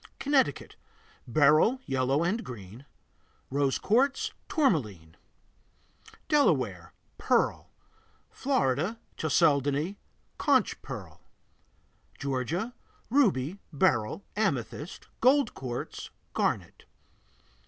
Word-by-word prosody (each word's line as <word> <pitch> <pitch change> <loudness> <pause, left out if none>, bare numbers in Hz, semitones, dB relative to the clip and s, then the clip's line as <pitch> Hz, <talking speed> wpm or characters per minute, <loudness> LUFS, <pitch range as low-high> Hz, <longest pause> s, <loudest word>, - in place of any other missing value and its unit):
Connecticut 280 -1 +1 0.5
Beryl, 155 - +4
yellow 135 +2 +1
and 205 +7 0
green; 115 +3 -10 0.6
rose 140 -1 +1
quartz, 265 +7 +1 0.2
tourmaline 110 - 0 1.1
Delaware 295 -2 +2 0.3
Pearl. - - +1 0.6
Florida 215 - 0 0.2
Chalcedony, 150 +2 +2 0.4
conch - - +2
pearl. - - -8 1.0
Georgia 140 - -2 0.4
Ruby, 200 - +2
beryl, 120 - +1
amethyst, 150 - -2
gold 265 0 +4
quartz, 125 -2 -6 0.2
garnet. - - -1
155 Hz, 70 wpm, -29 LUFS, -, 1.1 s, Beryl